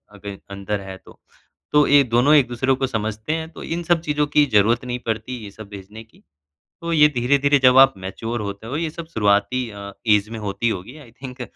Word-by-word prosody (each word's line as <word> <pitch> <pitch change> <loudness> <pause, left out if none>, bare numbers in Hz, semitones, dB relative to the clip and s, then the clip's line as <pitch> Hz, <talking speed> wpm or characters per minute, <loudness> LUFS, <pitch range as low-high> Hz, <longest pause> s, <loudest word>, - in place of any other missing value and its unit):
अगर 100 -1 -8
अंदर 100 +1 -4
है 95 -1 -9
तो। - - -17 0.5
तो 150 0 +5
ये 145 0 +6
दोनों 125 +4 +3
एक-दूसरे 130 -1 +2
को 135 0 -1
समझते 110 +2 -3
हैं, 160 0 -4
तो - - -10
इन 170 +1 -4
सब 170 -1 +1
चीज़ों 150 -2 -1
की 145 0 +3
ज़रूरत 115 +4 +3
नहीं 125 0 -4
पड़ती, 115 +3 -3
ये 100 - -10
सब 110 +1 -12
भेजने 105 +2 -11
की। 110 - -26 0.6
तो 170 0 -3
ये 150 -2 +6
धीरे-धीरे 140 +3 +2
जब 130 0 +6
आप 135 0 +7
मैच्योर 110 +5 -5
होते 100 +1 -6
हो, 135 +5 -3
ये 165 0 -2
सब 165 +1 -9
शुरुआती 110 +4 +1
अ, 100 -1 -9 0.2
एज 105 -1 +3
में 115 0 -7
होती 105 +3 -2
होगी 110 +8 -6
आई 130 -6 -15
थिंक 130 -1 -8
120 Hz, 215 wpm, -21 LUFS, 105-140 Hz, 0.6 s, आप